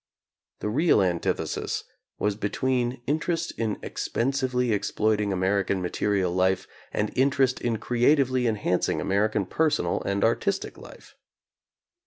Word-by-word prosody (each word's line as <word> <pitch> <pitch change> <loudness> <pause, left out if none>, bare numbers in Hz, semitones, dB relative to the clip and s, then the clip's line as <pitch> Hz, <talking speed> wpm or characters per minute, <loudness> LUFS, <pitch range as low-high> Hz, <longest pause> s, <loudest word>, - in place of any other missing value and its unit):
The 105 - -1
real 150 +4 +3
antithesis 90 -2 -1 0.3
was 105 -1 0
between 120 +4 -1
interest 165 +3 -1
in 110 -2 -2
expensively 125 -1 -1
exploiting 105 0 +1
Amer 95 +2 +1
ican 95 0 -1
material 95 +1 0
life 95 +1 +1 0.2
and 105 0 -2
interest 130 -1 +2
in 115 -2 0
creatively 130 +2 +2
enhanc 105 -5 0
ing - - 0
American 100 +1 +1
personal 150 - 0
and 100 0 -1
artistic 195 - 0
life. - - -14
110 Hz, 120 wpm, -26 LUFS, 100-130 Hz, 0.3 s, real